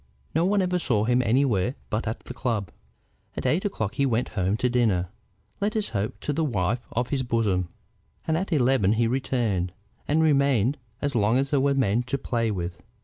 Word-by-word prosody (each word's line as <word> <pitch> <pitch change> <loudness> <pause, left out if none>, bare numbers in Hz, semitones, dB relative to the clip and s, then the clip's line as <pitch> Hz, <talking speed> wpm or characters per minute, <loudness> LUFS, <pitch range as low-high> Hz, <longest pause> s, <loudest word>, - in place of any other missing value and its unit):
No 160 +3 +2
one 200 0 +3
ever 180 0 0
saw 115 -10 +1
him 125 +2 +3
anywhere 125 -1 +2 0.2
but 105 +1 -1
at 110 - -3
the - - -8
club. 115 -8 -2 0.7
At - - -4
eight 175 +6 +1
o'clock 110 - -2
he 140 +2 +1
went 120 -1 0
home 95 +1 0
to 125 - +1
dinner, 110 -8 +1 0.5
let 210 +1 -1
us 215 -2 0
hope 105 0 -3
to 150 - -1
the 160 +3 0
wife 115 -3 -1
of 120 +1 -1
his 140 -2 0
bosom, 105 -8 0 0.6
and 160 - +1
at 185 +3 -2
eleven 125 - +3
he 115 +1 +2
returned, 115 -7 0 0.3
and 155 +2 +3
remained 140 -4 +3 0.2
as 140 0 0
long 115 0 +3
as 135 +1 0
there 140 -2 +3
were 140 0 +2
men 120 -4 +2
to 140 - 0
play 115 -3 -1
with. 90 -4 -4
120 Hz, 200 wpm, -26 LUFS, 105-140 Hz, 0.7 s, one